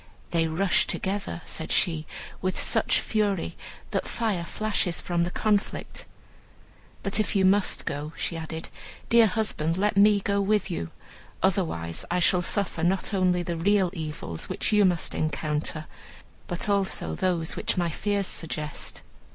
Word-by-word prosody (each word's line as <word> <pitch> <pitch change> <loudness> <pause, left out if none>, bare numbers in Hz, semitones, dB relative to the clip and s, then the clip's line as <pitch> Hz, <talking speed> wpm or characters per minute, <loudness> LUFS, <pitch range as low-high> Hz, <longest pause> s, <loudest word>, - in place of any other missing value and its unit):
"They 165 -1 +2
rush 175 +4 +2
together," 195 -3 -2
said 160 - -5
she, 160 -4 +1 0.3
"with 185 0 -1
such - - +3
fury 205 - 0 0.4
that - - -1
fire 215 -7 -1
flashes 205 -2 0
from 175 -1 -1
the 170 - +1
conflict. 210 +2 -1 1.0
But 195 +1 +2
if 215 - 0
you 190 -1 +4
must 195 +1 +3
go," 145 +2 -3
she 170 - -2
added, 160 0 -5 0.4
"dear 230 -1 +7
husband, 185 -6 0
let 205 +2 +1
me 205 0 +6
go 200 0 0
with 205 0 +1
you, 85 - -3 0.5
otherwise 165 - 0
I 175 - +1
shall 180 +1 +4
suffer 185 -2 -1
not 190 +4 +1
only 180 -2 +2
the 170 0 -3
real 190 +1 +3
evils 150 - -5
which - - -1
you 210 -1 +6
must 175 -2 +1
encounter, 155 0 -2 0.6
but 175 - -3
those 200 -2 +2
also 185 -2 0 0.2
which - - -2
my 175 -1 +1
fears 200 +4 -1
suggest." 155 -4 -4
180 Hz, 150 wpm, -27 LUFS, 165-200 Hz, 1.0 s, dear